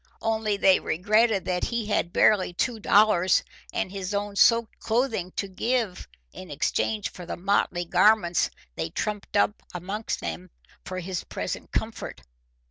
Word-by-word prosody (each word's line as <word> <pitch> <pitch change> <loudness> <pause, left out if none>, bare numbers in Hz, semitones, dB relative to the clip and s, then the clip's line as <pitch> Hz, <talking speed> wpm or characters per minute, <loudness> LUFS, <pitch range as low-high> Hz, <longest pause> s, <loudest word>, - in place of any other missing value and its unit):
Only 220 -2 0
they 190 -1 +5
regretted 210 +3 +2
that 180 -1 -1
he 235 -2 -2
had 205 -4 0
barely 190 -3 +3
two 230 +5 -1
dollars 200 -4 +4 0.3
and 185 - -2
his 195 0 -4
own 205 0 -3
soaked 230 +2 +3
clothing 225 -6 -1
to 200 - -3
give 225 0 -2 0.3
in 185 - -10
exchange 205 +8 -1
for 180 -2 -10
the - - -4
motley 180 -1 0
garments 180 0 +3 0.3
they 80 0 -3
trumped 210 - -3
up 205 +1 +2
among 195 +5 -5
them 85 +2 -5 0.4
for 185 - -5
his 180 0 -4
present - - -5
comfort. - - -4
200 Hz, 145 wpm, -26 LUFS, 180-215 Hz, 0.4 s, they